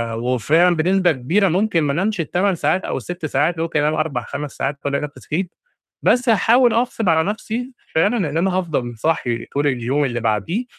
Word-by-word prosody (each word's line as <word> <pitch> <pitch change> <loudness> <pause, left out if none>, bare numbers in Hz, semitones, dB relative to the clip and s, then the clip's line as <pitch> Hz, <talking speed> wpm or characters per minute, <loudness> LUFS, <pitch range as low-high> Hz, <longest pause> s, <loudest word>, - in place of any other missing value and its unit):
وفعلًا 140 +9 +2
بنسبة 180 +2 +2
كبيرة 165 +10 +1
ممكن 185 -1 +1
ما 140 -2 0
أنامش 195 +4 -1
ال8 180 +4 0
ساعات 160 +4 0
أو - - -2
ال6 175 -2 -6
ساعات، 155 +4 0
ممكن 165 -2 -1
أنام 150 +1 +1
4، 155 -6 -1
5 145 0 -6
ساعات 140 +1 -2
وألاقي 140 0 0
نَفسي 150 0 -7
صحيت، 175 +3 -4 0.5
بس 250 -1 +2
هاحاول 230 +3 +4
أغصب 230 -4 0
على 160 0 +3
نَفسي 240 +4 -5 0.2
فعلًا 205 +9 +3
إن 160 - -2
أنا 185 +1 +1
هافضل 130 -10 -2
صاحي 120 -5 -1
طول 145 +1 -1
اليوم 130 +3 0
اللي 120 -2 -2
بعديه، 115 - -1
160 Hz, 185 wpm, -20 LUFS, 140-190 Hz, 0.5 s, هاحاول